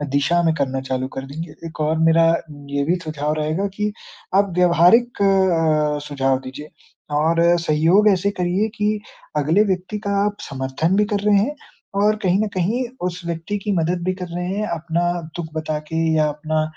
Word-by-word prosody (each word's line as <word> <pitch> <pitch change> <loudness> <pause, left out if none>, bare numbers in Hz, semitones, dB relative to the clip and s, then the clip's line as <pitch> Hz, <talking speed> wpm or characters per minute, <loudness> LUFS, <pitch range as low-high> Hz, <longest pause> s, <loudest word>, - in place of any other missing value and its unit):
दिशा 155 +5 +2
में 165 -1 +3
करना 135 -3 -1
चालू 130 0 -1
कर 135 - -4
देंगे। 155 +3 -7 0.2
एक 160 - -12
और 155 +1 +1
मेरा 165 0 +5 0.4
ये 140 0 0
भी 170 +4 +2
सुझाव 150 -1 -2
रहेगा 155 +6 -1
कि 210 0 0 0.4
आप 200 0 +3
व्यावहारिक 180 +7 +4
अ, 165 -6 +2
सुझाव 135 -2 0
दीजिए 150 +4 -8 0.5
और 160 +3 +2 0.2
सहयोग 165 +6 +3
ऐसे 195 0 +2
करिए 180 +4 +1
कि 210 0 0 0.4
अगले 160 +8 +3
व्यक्ति 190 +1 -2
का - - 0
आप 205 0 -2
समर्थन 135 +6 -1
भी 210 +1 +3
कर 205 - +1
रहे 205 - +5
हैं 245 +10 0 0.5
और 215 +1 +4
कहीं 185 +1 +2
न - - -1
कहीं 215 +8 0 0.2
उस 180 0 -6
व्यक्ति 170 +4 -3
की 210 - -1
मदद 170 +2 0
भी 185 - +1
कर 180 - -4
रहे 180 0 -2
हैं 205 +3 -2
अपना 170 +1 -1 0.3
दुख 160 -3 -6
बताके 155 0 -3 0.2
या 155 -1 +3
अपना 155 +1 -1
170 Hz, 180 wpm, -21 LUFS, 155-195 Hz, 0.5 s, मेरा